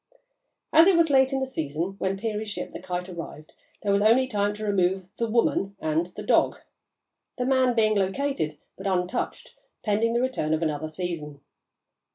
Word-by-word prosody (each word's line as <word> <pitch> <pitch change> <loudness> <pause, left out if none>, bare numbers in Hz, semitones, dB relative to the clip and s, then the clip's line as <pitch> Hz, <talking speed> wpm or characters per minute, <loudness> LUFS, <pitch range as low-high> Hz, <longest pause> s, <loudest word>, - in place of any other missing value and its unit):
As 325 +3 +8
it 380 -3 +5
was 330 -3 +4
late 265 0 +5
in 270 0 -1
the - - +1
season 160 - -3
when 190 +1 -1
Peary's 215 0 -3
ship, 205 - -5
the - - -7
Kite, 180 0 -4
arrived, 165 -3 -8 0.3
there 200 - +1
was 200 0 +3
only 230 +5 +5
time 205 -5 0
to 215 +1 -5
remove 190 -2 +1
the 230 -1 -1
"woman" 205 -3 +1
and 160 +2 0
the - - -6
"dog," - - +3 0.8
the 250 - -1
"man" 260 -2 +3
being 215 -2 +3
located 195 - -1 0.2
but - - -6
untouched 180 -1 -2 0.3
pending 220 +2 +1
the 235 - +2
return 250 -12 0
of 160 - -2
another 155 0 -2
season. 155 -4 -5
200 Hz, 180 wpm, -26 LUFS, 175-240 Hz, 0.8 s, As